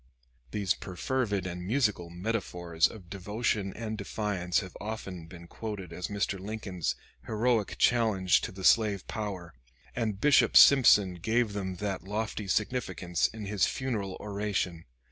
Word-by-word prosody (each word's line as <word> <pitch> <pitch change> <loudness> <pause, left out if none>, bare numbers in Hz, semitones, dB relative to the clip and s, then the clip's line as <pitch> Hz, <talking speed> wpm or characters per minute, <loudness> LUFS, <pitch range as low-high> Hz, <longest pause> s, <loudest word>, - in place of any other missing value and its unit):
These 100 +5 0
perfervid 100 +1 -2
and 90 -1 -5
musical 105 -5 0
metaphors 90 -3 0
of 100 -6 -12
devotion 105 +1 -1
and 110 -1 -4
defiance 95 -4 -1
have 95 -2 -10
often 100 -6 -6
been 85 0 -11
quoted 95 -2 -6
as 90 +1 -4
Mr. 100 -1 -2
Lincoln's 95 -3 -3 0.3
heroic 110 -1 +1
challenge 110 -7 +3
to - - -4
the 95 0 -9
slave 105 -2 +4
power, 95 -6 -5 0.4
and 110 -5 -1
Bishop 145 +5 +5
Simpson 105 -9 +7
gave 110 +2 +1
them 95 -2 -3
that 95 -1 -3
lofty 105 +1 -3
significance 95 -5 0
in 110 -2 -8
his 100 -1 +1
funeral 110 -8 -3
oration. 100 -5 -2
100 Hz, 135 wpm, -29 LUFS, 90-110 Hz, 0.4 s, Simpson